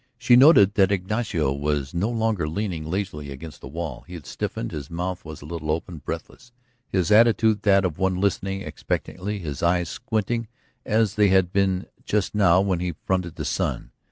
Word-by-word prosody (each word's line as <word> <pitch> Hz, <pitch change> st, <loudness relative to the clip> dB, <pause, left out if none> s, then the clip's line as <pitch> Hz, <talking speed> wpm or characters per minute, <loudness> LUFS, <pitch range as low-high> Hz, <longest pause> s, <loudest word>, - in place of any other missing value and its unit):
She 120 Hz, +1 st, +4 dB
noted 125 Hz, -, +7 dB
that 95 Hz, -2 st, +3 dB
Ignacio 95 Hz, -, 0 dB
was 70 Hz, 0 st, -2 dB
no 90 Hz, +6 st, 0 dB
longer 110 Hz, -9 st, 0 dB
leaning 85 Hz, -3 st, -3 dB
lazily 90 Hz, -6 st, -3 dB
against 70 Hz, +3 st, -9 dB
the -, -, -8 dB
wall; 75 Hz, -3 st, -5 dB
he 90 Hz, -, -9 dB
had 80 Hz, -5 st, -9 dB
stiffened, -, -, -4 dB
his 70 Hz, -2 st, -6 dB
mouth 90 Hz, +2 st, -4 dB
was 80 Hz, -2 st, -9 dB
a -, -, -10 dB
little 80 Hz, -1 st, -5 dB
open, 80 Hz, +1 st, -2 dB
breathless, 120 Hz, -, -7 dB, 0.4 s
his 95 Hz, +1 st, 0 dB
attitude 110 Hz, -1 st, +5 dB
that 100 Hz, -2 st, +4 dB
of 85 Hz, -3 st, -3 dB
one 95 Hz, -1 st, +1 dB
listening 95 Hz, 0 st, -1 dB
expectantly, 100 Hz, +3 st, -4 dB
his 75 Hz, -7 st, -6 dB
eyes 85 Hz, -1 st, +1 dB
squinting 115 Hz, -1 st, -2 dB, 0.4 s
as 110 Hz, -2 st, +2 dB
they 105 Hz, -1 st, +4 dB
had 95 Hz, -2 st, +3 dB
been 95 Hz, -1 st, +1 dB, 0.2 s
just 105 Hz, -2 st, -1 dB
now 95 Hz, -3 st, +4 dB
when 95 Hz, -3 st, 0 dB
he 90 Hz, -2 st, -3 dB
fronted 90 Hz, -3 st, -1 dB
the -, -, -5 dB
sun. -, -, -2 dB
95 Hz, 185 wpm, -24 LUFS, 80-105 Hz, 0.4 s, noted